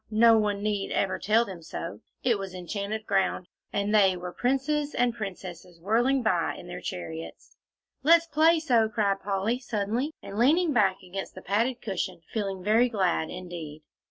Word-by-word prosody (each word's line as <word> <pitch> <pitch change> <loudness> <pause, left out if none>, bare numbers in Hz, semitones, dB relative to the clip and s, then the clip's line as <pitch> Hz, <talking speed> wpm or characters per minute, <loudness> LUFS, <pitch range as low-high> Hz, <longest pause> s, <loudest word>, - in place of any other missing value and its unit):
no 225 +1 +6
one 205 -2 +1
need 205 -2 -1
ever 190 - 0
tell 220 +4 +3
them 185 -5 -8
so; 165 +1 -6 0.2
it 235 -5 +2
was 190 -1 -6
enchanted 200 +4 -4
ground, 190 -3 0 0.2
and 200 +1 -1
they 195 -3 +5
were 180 0 -6
princes 285 +4 0
and 245 -1 +2
princesses 180 -5 -7
whirling 240 +8 +2
by 180 -6 +1
in - - -10
their 175 0 -7
chariots. 165 -3 -7 0.5
"Let's 335 +3 +6
play 325 +1 +4
so," 235 -8 +3
cried 205 -3 +1
Polly, 200 +5 -1
suddenly, 240 +3 -2
and 200 +2 -6
leaning 310 +6 +4
back 195 -5 +2
against 190 +1 -6
the 185 - -10
padded 235 +6 0
cushion, 185 -4 -3
feeling 195 -4 -2
very 225 +5 +4
glad 185 -7 0
indeed. 170 -4 -8
205 Hz, 165 wpm, -27 LUFS, 185-235 Hz, 0.5 s, no